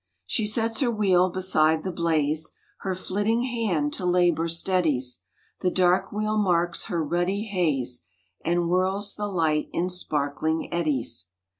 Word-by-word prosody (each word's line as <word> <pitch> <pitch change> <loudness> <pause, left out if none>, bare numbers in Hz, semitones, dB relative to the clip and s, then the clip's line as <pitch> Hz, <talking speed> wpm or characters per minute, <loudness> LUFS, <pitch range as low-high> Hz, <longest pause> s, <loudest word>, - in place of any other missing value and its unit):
She 220 -4 +1
sets 225 +1 +1
her 260 - +2
wheel 190 -5 +3
beside 160 -4 +2
the 185 - -2
blaze, 160 -2 0 0.3
Her 190 -1 -3
flitting 205 +6 0
hand 210 - -1
to 185 - -3
labour 175 -2 +2
steadies, 165 -7 0 0.4
The 185 - +1
dark 180 0 +2
wheel 215 +1 -1
marks 175 -3 +1
the 175 - -2
ruddy 175 +6 0
haze, 150 - -1 0.4
And 175 +1 +1
whirls 190 +3 +1
the 210 0 -3
light 160 -6 0
in 180 +2 -1
sparkling 155 -2 -2
eddies. 130 - -1
175 Hz, 140 wpm, -25 LUFS, 155-195 Hz, 0.4 s, wheel